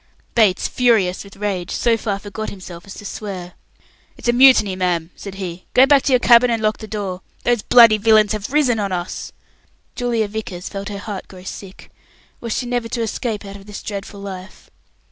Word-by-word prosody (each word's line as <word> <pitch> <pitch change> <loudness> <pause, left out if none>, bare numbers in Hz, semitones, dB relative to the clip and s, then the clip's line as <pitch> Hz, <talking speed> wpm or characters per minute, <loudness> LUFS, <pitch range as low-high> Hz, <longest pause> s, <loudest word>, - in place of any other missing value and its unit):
Bates, 210 -5 +3
furious 220 -8 +2
with 200 -1 -14
rage, 195 -4 -3
so 235 -1 +2
far 210 -3 -2
forgot 205 +2 -6
himself 180 -2 -10
as 195 - -9
to 205 - -10
swear. 190 -4 -6 0.6
"It's - - -7
a 240 - +4
mutiny, 245 -6 +6
ma'am," 175 -2 -1
said 200 -1 -9
he. 185 -2 -7
"Go 260 - +8
back 280 0 +5
to 275 - -1
your 255 - +6
cabin 240 0 +6
and 230 -1 +1
lock 215 0 0
the 220 - -9
door. 195 -4 -4 0.2
Those 240 -3 +2
bloody 230 -2 +7
villains 215 -1 +4
have 215 +2 -3
risen 270 -6 +2
on 200 -2 -2
us!" 175 -1 -4 0.6
Julia 235 -3 0
Vickers 200 -4 -6
felt 200 0 -6
her 205 - -5
heart 200 -1 -6
grow 185 -1 -13
sick. 190 0 -10 0.5
Was 230 -2 -3
she 250 - -2
never 240 -1 -2
to 235 -1 -2
escape 220 -1 -3
out 200 0 -8
of 195 0 -15
this 210 - -8
dreadful 200 0 -6
life? 190 -1 -9
210 Hz, 200 wpm, -20 LUFS, 190-230 Hz, 0.6 s, Go